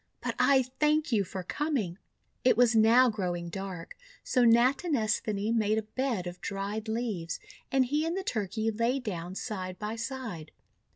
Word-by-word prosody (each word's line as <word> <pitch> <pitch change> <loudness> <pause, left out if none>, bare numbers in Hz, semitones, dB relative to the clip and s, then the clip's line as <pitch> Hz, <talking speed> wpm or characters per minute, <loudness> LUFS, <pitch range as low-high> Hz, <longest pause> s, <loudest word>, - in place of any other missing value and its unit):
But - - -3
I 265 +1 +5
thank 300 +4 +1
you 210 -4 +3
for 190 0 -6
coming!'1 235 - -2 0.5
It 250 - +4
was 240 -1 +5
now 230 +4 +6
growing 175 -4 -3
dark, 185 -2 -6 0.3
so 250 - +2
Natinesthani 230 - +2
made 215 -1 +2
a 220 - 0
bed 230 -3 -2
of 175 0 -7
dried 200 +3 -4
leaves, 220 -7 -2 0.3
and 265 -1 +4
he 295 +5 0
and 330 +3 -1
the 385 - -2
Turkey 220 - -1
lay 230 +4 +1
down 185 -7 -5
side 185 -5 -4
by 210 +2 -4
side. 230 - -5
220 Hz, 160 wpm, -29 LUFS, 195-255 Hz, 0.5 s, now